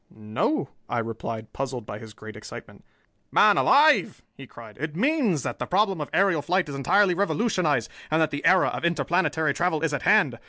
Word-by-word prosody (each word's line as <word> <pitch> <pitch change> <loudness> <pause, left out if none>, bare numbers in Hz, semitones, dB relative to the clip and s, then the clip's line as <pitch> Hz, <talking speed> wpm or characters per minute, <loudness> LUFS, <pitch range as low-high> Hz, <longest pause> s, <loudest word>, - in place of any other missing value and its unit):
"No," 110 - -2 0.2
I 120 - -2
replied, 115 -1 -5
puzzled 130 -4 -5
by 105 - -7
his 110 -1 -12
great 110 0 -11
excitement. 105 - -11 0.5
"Man 210 -1 +5
alive," 290 -5 +3
he 135 - -12
cried, 115 -2 -14
"it 155 +1 -4
means 230 - +1
that - - -5
the - - -4
problem 195 -2 +1
of 145 - -5
aerial 190 -6 +2
flight 180 +3 0
is 145 - -7
entirely 180 +8 +2
revolutionized, 180 - 0 0.2
and 155 +1 +1
that 160 -1 +1
the 145 - -5
era 180 +2 +4
of - - -6
interplanetary 165 -1 0
travel 165 -2 -1
is 160 -2 0
at - - -2
hand! - - +2
160 Hz, 190 wpm, -25 LUFS, 125-190 Hz, 0.5 s, Man